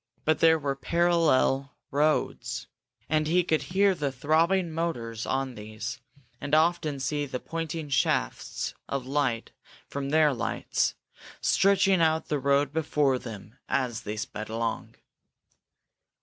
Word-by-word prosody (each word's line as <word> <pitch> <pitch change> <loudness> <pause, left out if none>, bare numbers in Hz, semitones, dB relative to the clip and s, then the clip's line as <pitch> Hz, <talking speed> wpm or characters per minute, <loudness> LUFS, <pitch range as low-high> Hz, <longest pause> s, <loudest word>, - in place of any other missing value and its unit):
But 155 0 +2
there 160 0 +6
were 140 -2 -2
parallel 155 -4 +2 0.2
roads, 150 +2 0 0.4
and 155 +1 +1
he 175 +3 +3
could 160 -2 +1
hear 195 +2 +2
the 145 -6 -2
throbbing 165 +6 +2
motors 120 -9 -3
on 135 -1 -1
these, 110 +4 -6 0.4
and 145 +1 +1
often 160 -3 +2
see 145 +2 -1
the 130 -1 -4
pointing 165 0 -4
shafts 135 - 0 0.2
of 140 -2 -2
light 130 -4 -1 0.3
from 140 -1 -4
their 155 -1 +4
lights, 120 - -1 0.4
searching 195 -2 +3
out 160 0 +2
the 150 - 0
road 140 +2 +2
before 150 -4 +1
them 115 -1 -10
as 125 -4 0
they 105 +1 -5
sped 110 0 -5
along. 115 0 -3
145 Hz, 130 wpm, -27 LUFS, 130-160 Hz, 0.4 s, there